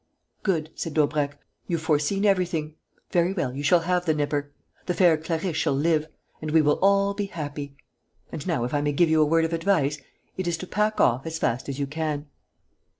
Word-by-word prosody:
"Good," 165 -6 -1
said 165 - -5
Daubrecq; 145 -2 +1 0.3
"you've 165 -2 -2
foreseen 160 +6 +1
everything. 175 -6 +1 0.4
Very 175 +1 +2
well, 145 -10 -2
you 140 - -4
shall 170 +4 +4
have 180 +1 0
the 155 - +3
nipper; 145 -1 -1 0.4
the 180 - 0
fair 175 -4 +5
Clarisse 160 +2 -2
shall 135 - +1
live; 155 +1 +1 0.3
and 155 - -4
we 160 +1 +4
will 150 -1 +3
all 200 +1 +4
be 200 0 -3
happy. 145 -5 -6 0.6
And 155 +1 -6
now, 160 -9 0
if 125 - -3
I 145 - +1
may 145 0 0
give 165 +3 +3
you 160 -1 +4
a - - +5
word 165 +1 +3
of 165 - -3
advice, 165 -4 +1 0.4
it 185 -1 -2
is 170 -1 0
to 185 - -6
pack 210 +3 0
off 125 +5 +3
as 160 0 -3
fast 130 -2 -1
as 135 - -4
you 140 - -1
can." 150 0 -3
160 Hz, 210 wpm, -25 LUFS, 145-175 Hz, 0.6 s, fair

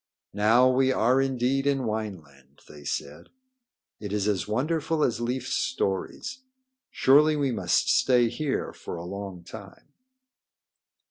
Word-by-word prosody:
"Now 110 +5 +4
we 130 +1 +3
are 130 +1 +3
indeed 135 +1 0
in 135 -2 +1
Wineland," 80 - -6
they 75 -1 -13
said. 70 +1 -5 0.7
"It 105 -2 -6
is 105 -1 -1
as 100 -3 0
wonderful 155 +7 0
as 120 -1 0
Leif's 130 +2 -2
stories. 100 - -2 0.5
Surely 150 +3 +4
we 140 -3 0
must 115 - +1
stay 125 -2 +4
here 135 +5 -3
for - - -8
a 85 0 -7
long 95 -1 -7
time." 100 +6 -12
120 Hz, 130 wpm, -26 LUFS, 100-135 Hz, 0.7 s, Now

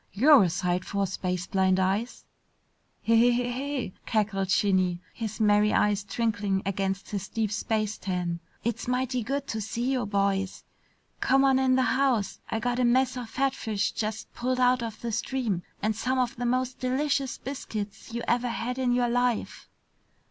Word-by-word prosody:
"You're 270 +7 +7
a - - +1
sight 180 +1 -1
for 200 0 -1
space 180 -1 -3
blind 190 0 +2
eyes!" 195 +6 -1 0.8
"Heh 230 - +2
heh 240 +1 +4
heh," 270 -2 -3 0.2
cackled 205 -4 0
Shinny, 185 -3 +2
his 220 -2 -5
merry 210 0 +4
eyes 205 -1 +2
twinkling 205 -3 -1
against 195 0 -2
his 200 -2 -3
deep 220 -3 -1
space 215 -1 -1
tan. 180 -2 -2 0.2
"It's 235 +1 -2
mighty 250 0 0
good 275 +5 -2
to 220 - -2
see 235 +5 -2
you 255 -5 0
boys. 200 -1 0 0.6
Come 270 +1 +4
on 265 -1 +4
in 260 -1 +3
the 260 - +3
house. 255 -7 +1
I - - -1
got 245 +2 -1
a - - +3
mess 255 +2 +3
of 245 -3 -6
fatfish 225 -6 -1
just 215 0 -4
pulled 255 +1 -1
out 250 0 +4
of 225 -2 -5
the 235 - -3
stream 225 -4 -1 0.2
and 215 0 +1
some 255 +4 -1
of 250 -2 0
the 245 0 -2
most 255 +1 0
delicious 270 +1 0
biscuits 215 -7 -6
you 235 +1 -4
ever 245 +1 +1
had 250 +2 -3
in 250 -2 +2
your 245 0 +2
life!" 245 -1 -1
230 Hz, 170 wpm, -27 LUFS, 200-250 Hz, 0.8 s, You're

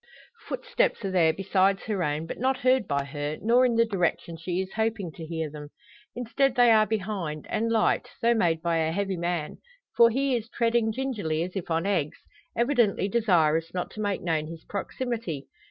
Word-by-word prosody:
Footsteps - - -1
are 195 - -2
there 170 -4 +4
besides 195 +2 +1
her 205 -5 -1
own, 150 +1 -1
but - - -7
not 260 +2 +1
heard 255 -4 +3
by 140 -1 0
her, 145 +2 -4
nor 245 +3 +4
in 235 - 0
the 230 0 +4
direction 180 -5 -1
she 175 +2 -3
is 190 0 -4
hoping 220 -5 -1
to 165 - -10
hear 160 -1 -3
them. 150 0 -9 0.5
Instead, 245 +2 0
they 245 -2 +6
are 215 -1 +5
behind, 195 -8 -3
and 230 +1 0
light, 225 -1 +2
though 235 +1 +3
made 165 -8 +1
by 170 -1 +1
a 160 0 +1
heavy 195 +2 -1
man. 170 -3 -3 0.4
For 235 0 +7
he 265 +2 +1
is 230 -1 -4
treading 230 -1 +1
gingerly 215 -11 -2
as 180 +2 -7
if 190 -3 -4
on 165 +2 0
eggs 170 -7 0 0.4
evidently 235 -5 +2
desirous 165 -7 +2
not 180 - -3
to 215 - -6
make 205 -2 -1
known 160 -3 0
his 165 0 -9
proximity. 210 - -4
195 Hz, 190 wpm, -27 LUFS, 165-230 Hz, 0.5 s, For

